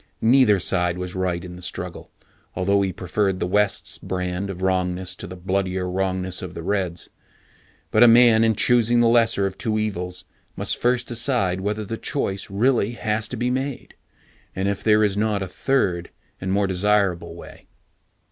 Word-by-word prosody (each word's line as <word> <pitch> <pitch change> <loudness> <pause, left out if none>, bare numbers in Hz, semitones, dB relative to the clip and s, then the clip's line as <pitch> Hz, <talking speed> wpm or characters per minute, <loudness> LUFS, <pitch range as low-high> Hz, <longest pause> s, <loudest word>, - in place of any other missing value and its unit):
Neither 115 -3 +4
side 90 0 0
was 90 0 -5
right 90 -2 -2
in 90 -1 -9
the 90 - -11
struggle, - - -6 0.5
although 100 +2 +2
he 95 -1 0
preferred 95 +2 -1
the - - -1
West's 105 +2 0
brand 90 +1 -3
of 95 -1 -6
wrongness 90 -1 0
to - - -8
the 90 - -8
bloodier 95 0 -2
wrongness 95 0 -2
of 90 -1 -7
the 85 - -6
Reds. 90 -3 -2 0.8
But 110 - +3
a 120 - +9
man 115 -1 +6
in 110 -1 +3
choosing 120 +1 +3
the 120 - +4
lesser 115 -4 +3
of 95 -1 -4
two 110 -1 -1
evils 90 -4 -3 0.3
must - - -1
first 125 0 +2
decide 120 -7 0
whether 105 +2 -2
the 115 +3 -5
choice 100 -9 -3
really 115 +2 +1
has 110 -2 -1
to 125 - -6
be 125 +2 0
made, 130 +1 -4 0.6
and 95 +1 -1
if 100 -1 -2
there 110 -1 +4
is 100 -1 +1
not 105 -2 0
a - - -5
third 90 -6 -1 0.3
and 95 0 -2
more 100 +1 +2
desirable 95 -1 0
way. - - -13
100 Hz, 175 wpm, -23 LUFS, 90-110 Hz, 0.8 s, a